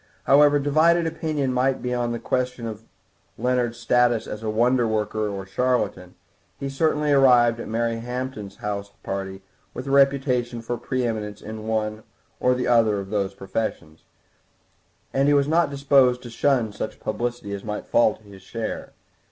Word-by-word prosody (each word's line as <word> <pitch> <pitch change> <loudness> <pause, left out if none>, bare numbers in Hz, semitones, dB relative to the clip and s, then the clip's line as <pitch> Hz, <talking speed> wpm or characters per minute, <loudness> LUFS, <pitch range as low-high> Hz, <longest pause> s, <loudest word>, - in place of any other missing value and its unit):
However 145 +1 +5
divided 155 +4 +3
opinion 155 -5 -1
might 130 +1 +1
be 125 0 -1
on 120 -1 -1
the 120 - -2
question 125 0 -2
of 110 0 -7 0.5
Leonard's 125 -2 0
status 120 -1 +2
as 105 - -6
a 110 - -5
wonderworker 110 -2 +1
or 100 -1 -5
a - - -15
charlatan, 105 -5 -1 0.4
he 140 - -3
certainly 150 +1 +1
arrived 125 -4 +5
at - - -6
Mary 115 +1 -1
Hampton's 125 -4 -5
house 105 -3 -4
party 95 0 -5 0.3
with 125 - -5
a 135 - -3
reputation 135 -3 +2
for 120 +1 -2
pre 130 +1 -2
eminence 105 -3 -3
in 110 0 -8
one 110 -1 -1 0.4
or 125 0 +2
other 115 -4 +3
of 100 0 -7
those 100 -2 -1
professions, 95 -5 -4 1.1
and 135 +1 +2
he 145 - +5
was 140 0 +3
not 165 0 +3
disposed 135 -3 +3
to 120 - -9
shun 120 -4 +1
such - - -5
publicity 120 -4 -3
as 100 - -5
might 105 -1 -5
fall 115 -2 +3
to - - -23
his 100 -2 -14
share. 110 +4 -5
120 Hz, 165 wpm, -24 LUFS, 110-135 Hz, 1.1 s, However